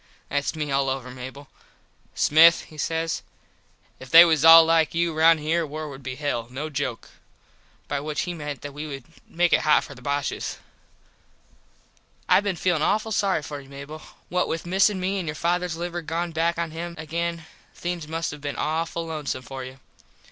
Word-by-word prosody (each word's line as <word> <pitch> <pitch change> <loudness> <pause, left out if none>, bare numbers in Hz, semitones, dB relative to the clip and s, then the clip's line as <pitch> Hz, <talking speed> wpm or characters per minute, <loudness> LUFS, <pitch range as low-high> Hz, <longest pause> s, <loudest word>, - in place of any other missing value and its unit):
Thats 145 +2 -1
me 150 -2 -3
all 135 0 +1
over, 130 -1 -4
Mable. 130 +3 -9 0.7
"Smith" 165 +2 +6
he 155 - -15
says 165 +2 -1 0.8
"If 130 - -11
they 165 +5 +10
was 160 -3 +2
all 165 0 +10
like 165 -1 +2
you 170 0 +1
round 160 +1 +5
here 165 +3 +1
war 155 0 -5
would 135 -1 -10
be 130 -1 -5
hell, 135 -5 -2
no 145 +5 -5
joke." 135 -5 -4 0.8
By 145 - -2
which 150 +1 -3
he 175 - -3
meant 150 -4 -6
that 145 -1 -7
we 150 +2 -6
would 135 -3 -7 0.2
make 175 +1 +1
it - - +4
hot 155 - +4
for - - -10
the 130 - -15
Boshes. 140 +1 -2 1.7
I - - +6
been 200 -2 -2
feelin 175 -2 0
awful 215 +6 +1
sorry 195 -6 +1
for 145 -1 -6
you, 135 - -17
Mable. 140 +3 -9 0.3
What 180 0 0
with 165 - -3
missin 190 +2 +2
me 190 +2 -1
and 175 - -5
your 150 - -3
fathers 175 +1 -1
liver 175 0 -4
gone 170 +2 -3
back 165 +1 0
on 170 -1 -2
him 170 +2 -6
again 165 +1 -3 0.3
things 175 -3 -4
must 165 +1 -3
have 150 - -10
been 145 -1 -4
awful 165 +1 -2
lonesome 150 -5 -4
for 135 +1 -7
you. 130 +1 -9
160 Hz, 190 wpm, -24 LUFS, 145-170 Hz, 1.7 s, they